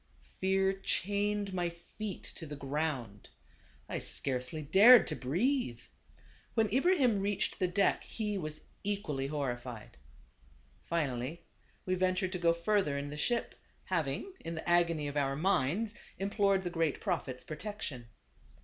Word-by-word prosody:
Fear 190 0 +2
chained 205 +1 0
my 175 -2 0
feet 175 +4 -7
to 160 - -5
the 145 - -6
ground. 135 -7 -3 0.6
I - - -3
scarcely 130 +3 -1
THE - - -8
GABAVAN. 190 - +3
Ill - - +8
dared - - -1
to 155 - -2
breathe. 175 - 0 0.8
When 220 -2 +3
Ibrahim 265 - +4
reached 200 0 -1
the 185 - +2
deck, 195 +3 +2
he 210 -2 -3
was 155 -5 -4 0.2
equally 195 -10 -1
horrified. 125 -6 -4 0.9
Finally 150 0 -2 0.4
we 185 - 0
ventured 185 0 +1
to 180 - -3
go 170 -1 +4
further 170 -3 +1
in 140 +1 -4
the - - -5
ship, 235 +10 0 0.3
having, 170 - -2
in 165 - -5
the 160 - -6
agony 170 -3 +3
of 145 +1 -4
our 135 -1 +1
minds, 190 +5 +1 0.2
implored 195 -1 +2
the 175 - -3
great 165 -4 0
Prophet's 145 - -2
pro 155 - -6
tection. 155 - -5
170 Hz, 150 wpm, -32 LUFS, 145-200 Hz, 0.9 s, Ill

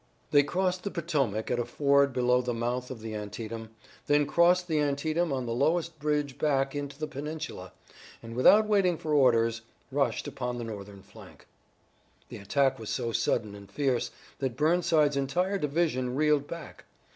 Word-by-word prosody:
They 145 - +7
crossed 180 +4 -1
the 200 - -2
Potomac 145 - -1
at 120 - 0
a - - +1
ford 140 +3 +2
below 125 0 +2
the 125 -1 -3
mouth 125 +2 -2
of 125 -4 -8
the 110 0 -6
Antietam, 110 +2 -6 0.4
then 145 0 +4
crossed 175 +4 +3
the 160 -3 +1
Antietam 155 +3 0
on 130 -2 -2
the 115 - -2
lowest 160 +5 0
bridge 150 -2 -1
back 135 -3 +1
into 145 -1 -5
the 155 - -3
peninsula, 150 - -6 0.5
and 115 0 -8
without 205 - +6
waiting 195 -5 +2
for 155 -1 -3
orders 115 -5 +3 0.3
rushed 135 -2 0
upon 125 -3 -4
the 120 - -4
Northern 100 -3 -8
flank. 100 0 -15 0.8
The - - -8
attack 135 +7 +1
was 110 - -7
so 120 -3 -2
sudden 110 -2 0
and 100 -1 -12
fierce 130 -1 0 0.3
that 130 -3 -2
Burnside's 155 -2 +3
entire 180 +9 0
division 140 -5 0
reeled 150 -1 +2
back. 170 -1 -9
140 Hz, 170 wpm, -28 LUFS, 120-155 Hz, 0.8 s, They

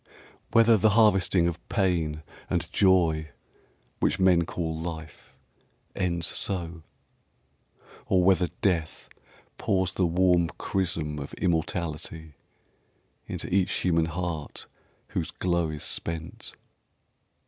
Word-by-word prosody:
Whether 115 -1 +6
the 110 +2 +4
harvesting 95 -5 +4
of 85 0 -5
pain 85 -7 0 0.3
and - - -2
joy 85 -5 +3 0.7
Which - - +1
men 90 -3 +4
call 80 -1 -3
Life 80 -2 -8 0.6
ends 85 -2 -1
so, 85 -4 -2 1.3
or 95 -2 +3
whether 90 -1 +4 0.2
death 85 -5 -1 0.5
Pours 95 -1 0
the 90 -2 +1
warm 90 0 +3
chrism 80 -5 -2
of 70 - -7
Immortality 80 -2 -2 0.9
Into - - -4
each 95 -1 +2
human 85 -3 +2
heart 85 -2 -5 0.4
whose - - -2
glow 85 -3 0
is 75 -1 -6
spent. 80 -1 -5
85 Hz, 105 wpm, -27 LUFS, 80-95 Hz, 1.3 s, Whether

